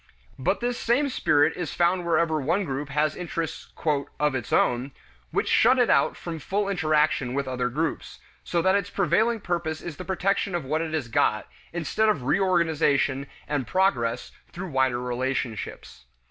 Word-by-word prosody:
But 135 - 0
this 245 0 -1
same 265 +5 +2
spirit 150 - +2
is 175 -3 -4
found 175 0 +2
wherever 160 -2 +2
one 170 +8 0
group 140 0 -4
has 150 +2 +1
interests 165 -2 -5 0.5
"of 150 -1 +2
its 125 -4 -4
own" 125 +3 +1 0.4
which - - -1
shut 250 +3 +5
it 245 -2 +3
out - - +3
from 165 -2 -6
full 200 +7 -1
interaction 155 -7 +1
with 140 -1 -1
other 125 -1 -1
groups, 155 +5 -3 0.3
so 170 -1 0
that 190 - +4
its 200 -1 0
prevailing 225 +2 +1
purpose 170 -4 -2
is 165 -4 -7
the - - -6
protection 190 0 0
of 170 - -2
what 155 +4 0
it 160 -1 -2
has 145 -6 -2
got, 110 -1 +1 0.2
instead 175 +6 0
of 150 -12 0
reorganization 150 -5 +2 0.2
and 145 -4 -2
progress 125 -12 +1 0.2
through 180 +1 -6
wider 130 -2 +2
relationships. 125 - -4
160 Hz, 165 wpm, -25 LUFS, 135-185 Hz, 0.5 s, shut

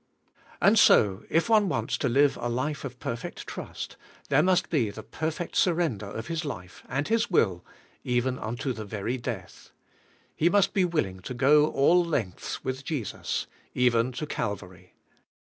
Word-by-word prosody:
And - - +5
so, 100 0 +5
if 165 - +2
one 215 -4 +4
wants 115 -7 -1
to 135 - +1
live 140 +3 +4
a 120 - -3
life 135 +5 -2
of 130 -3 -6
perfect 115 0 -5
trust, - - -7 0.3
there - - +5
must 185 0 +2
be 130 -10 +2
the 110 +2 -8
perfect 160 - -4
surrender 165 - +1
of 110 +2 -6
his 165 0 -3
life, 90 -11 -7
and 135 +3 -1
his 230 +2 +1
will, 95 - +2 0.4
even 125 +1 0
unto 120 +4 -3
the 110 -1 -6
very 105 +4 -3
death. 115 -7 -7 0.7
He 170 - +3
must 200 +1 +3
be 190 -3 +3
will 170 - +1
ing 95 -1 -9
to 125 +7 -7
go 150 +4 +5
all 165 +5 +4
lengths 130 - -3
with 130 +1 -3
Jesus, 135 - -3 0.3
even 125 -1 +3
to 150 - -4
Calvary. 100 - -5
130 Hz, 165 wpm, -27 LUFS, 110-160 Hz, 0.7 s, And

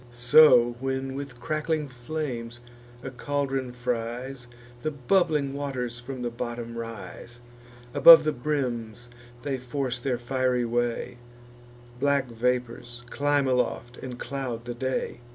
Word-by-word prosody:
So, 120 0 +6
when 135 0 -2
with 135 -3 -7
crackling 155 +2 -1
flames 120 -2 -5 0.4
a 135 - -5
caldron 135 -1 -2
fries, 125 +1 -4 0.3
The 155 - -1
bubbling 150 0 +1
waters 130 -4 -4
from 125 0 -7
the 120 - -2
bottom 120 0 -5
rise: 115 +1 -8 0.5
Above 160 +4 +10
the 155 - +1
brims 120 -4 -3 0.3
they 135 -2 -2
force 125 -1 -3
their 125 0 -1
fiery 125 0 0
way; 120 +1 -2 0.8
Black 140 -1 +1
vapours 120 0 -2
climb 145 -1 +1
aloft, 125 -1 -1
and 125 -2 -7
cloud 125 -4 -4
the 120 - -4
day. 130 +1 -3
125 Hz, 120 wpm, -26 LUFS, 120-140 Hz, 0.8 s, Above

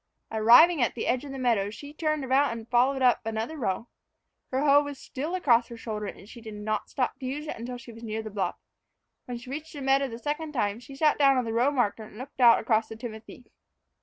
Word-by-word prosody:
Arrived 245 +9 +6
at 240 - +1
the 235 - -3
edge 250 +2 0
of 285 - -8
the 270 - -6
meadow, 230 -6 +1
she 285 +7 -10
turned 305 -2 -1
about 270 +1 +3
and 230 -1 -7
followed 260 +2 +3
up 245 -1 +4
another 225 +6 -3
row. 230 -5 -2 0.6
Her 265 +2 0
hoe 285 0 +6
was 285 -1 -6
still 295 +8 -5
across 240 -10 +3
her 235 - -9
shoulder, 215 -2 -5
and 200 - -9
she 235 +1 -12
did 220 -2 -8
not 210 0 -3
stop 260 0 -2
to 265 - -7
use 290 +4 -4
it - - -5
until 245 +2 -6
she 245 -1 -11
was 230 0 -13
near 220 -1 -4
the 215 - -7
bluff. 195 -3 -2 0.7
When 245 -1 -5
she 240 +2 -10
reached 305 +3 -6
the 290 - -7
meadow 270 +1 +3
the 230 -3 -7
second 300 +5 -4
time, 210 -4 -1
she 260 +3 -12
sat 300 +2 +2
down 275 -2 +5
on 250 - 0
the 225 - -3
row 240 +4 +3
marker 245 -6 0
and 215 -1 -11
looked 260 +2 -8
out 235 -1 +8
across 220 0 +1
the 220 - -8
timothy. 225 +1 -9
245 Hz, 245 wpm, -27 LUFS, 225-275 Hz, 0.7 s, out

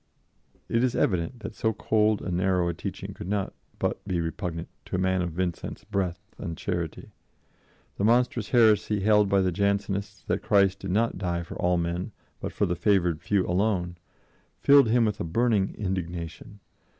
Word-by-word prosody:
It 115 +1 +1
is 130 - +1
evident 95 +6 0
that - - -6
so 110 -1 0
cold 110 0 +1
and 90 - -2
narrow 90 -1 +2
a 85 - 0
teaching - - -6
could - - -8
not 100 -1 -1 0.2
but - - -2
be 90 -3 0
repugnant 85 0 -3 0.2
to - - -4
a - - +1
man 95 0 +1
of 90 - -1
Vincent's 90 +1 -3
breadth 95 -4 -2 0.2
and 80 -2 -5
charity. 85 -4 -4 0.9
The - - 0
monstrous 120 -1 +2
heresy 110 -3 +4
held 105 0 +4
by 100 0 +4
the 95 -1 +1
Jansenists 100 +1 -1
that - - -1
Christ 100 -1 +3
did 95 - -6
not 110 +5 +1
die 85 -2 -1
for 80 - -9
all 90 0 +1
men, 85 +4 -2 0.3
but - - -4
for - - 0
the 90 - -1
favored 90 -3 +2
few 100 -3 +1
alone, 90 -1 0 0.6
filled 140 -4 +6
him 120 0 +4
with 105 -2 -1
a - - -1
burning 105 +3 +1
indignation. 90 0 -5
95 Hz, 175 wpm, -27 LUFS, 90-105 Hz, 0.9 s, filled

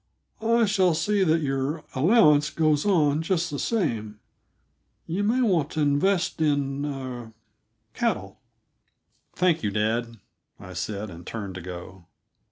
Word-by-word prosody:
"I 230 +1 +3
shall 190 -5 +2
see 195 +5 +1
that 160 -2 +2
your 135 +3 -2
allowance 150 - +4
goes 155 +2 +1
on 155 -6 +3
just 170 -1 -1
the 145 - -4
same; 115 - -2 0.9
you 180 +5 -2
may 235 +5 +2
want 170 -10 +2
to 155 - -1
invest 170 +5 +1
in 140 -2 0
er 130 -5 -6 0.6
cattle." - - -2 1.0
"Thank 175 -2 +2
you, 105 - 0
dad," 115 +3 -1 0.4
I 95 - -10
said, 100 +3 -4
and 85 +1 -10
turned 100 -1 -6
to 90 - -7
go. 90 0 -9
145 Hz, 135 wpm, -25 LUFS, 115-175 Hz, 1.0 s, allowance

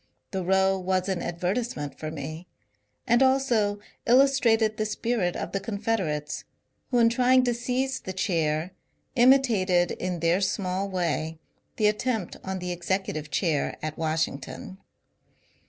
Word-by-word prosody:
The 190 -3 -2
row 190 +1 +3
was 185 0 0
an 190 -2 -1
advertise 185 +8 -2
ment 145 -1 -6
for 155 - -4
me, 155 +3 -7 0.6
and 240 +2 +3
also 255 -6 +3 0.3
illustrated 235 -4 +4
the 215 - 0
spirit 210 -4 -1
of - - -4
the 195 - -1
Confed 220 +2 -1
erates, 150 -4 -3 0.5
who 245 - +1
in 230 -1 +6
trying 250 +2 +4
to 245 -1 +1
seize 250 +3 -1
the 185 - -6
chair 165 -3 0 0.4
imitated 225 -9 +4
in 180 -1 -3
their 170 +3 +2
small 195 0 -1
way 165 -3 -1 0.4
the 215 - +1
attempt 215 -2 0
on 190 0 -3
the 180 -1 -4
executive 175 -3 -2
chair 160 -3 0
at 155 0 -3
Washington. 160 +3 -3
190 Hz, 140 wpm, -26 LUFS, 175-230 Hz, 0.6 s, in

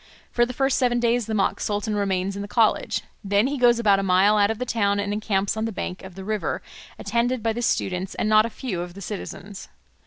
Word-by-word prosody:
For 240 0 +2
the - - -4
first 270 +1 +1
seven 245 -2 +2
days 235 -1 +1
the 220 - -2
mock 195 - +1
sultan 210 +1 -2
remains 195 -1 -1
in 200 - -4
the 205 - -5
college; 220 +1 +1 0.2
then 200 +2 +2
he 280 +1 -2
goes 240 -1 +5
about 205 -4 +3
a - - 0
mile 195 +2 +4
out 205 -1 +4
of 225 - -2
the 250 - -3
town 205 -4 +1
and 200 0 -1
encamps 205 -2 0
on 220 0 -1
the 225 - -2
bank 185 -2 -5
of 190 -2 -10
the 190 -1 -8
river, 210 -5 -2 0.3
attended 235 +3 -1
by 225 -1 +1
the 240 - -4
students 185 -5 -1
and - - -1
not 215 0 +6
a - - -7
few 215 -7 -4
of 175 0 -7
the 200 - -9
citizens. 200 0 -7
210 Hz, 245 wpm, -24 LUFS, 195-235 Hz, 0.3 s, not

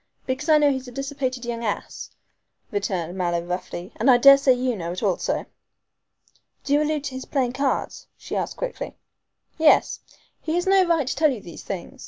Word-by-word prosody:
"Because 270 +5 -3
I 310 - +7
know 295 -1 +4
he's 260 -1 -4
a - - -8
dissipated 270 -1 -4
young 235 -1 -4
ass," 210 -3 -4 0.6
returned 190 -4 -2
Mallow 175 -2 0
roughly; 180 0 -5
"and 235 +5 +2
I 250 - +7
daresay 275 +1 +7
you 250 -1 -1
know 170 -3 -4
it 180 - -6
also." - - 0 1.2
"Do 280 - -1
you 295 - +4
allude 300 -1 -1
to 280 - -5
his 260 0 -6
playing 255 -4 -1
cards?" 275 +1 -2
she - - -7
asked - - -3
quickly. - - -5 0.6
"Yes. 315 -1 +4 0.4
He 320 +1 -2
has 350 - 0
no 380 -1 +4
right 330 -4 +2
to 260 - -2
tell 305 +2 +3
you 245 - -4
these 170 -4 -10
things. 185 -3 -7
260 Hz, 190 wpm, -23 LUFS, 205-290 Hz, 1.2 s, I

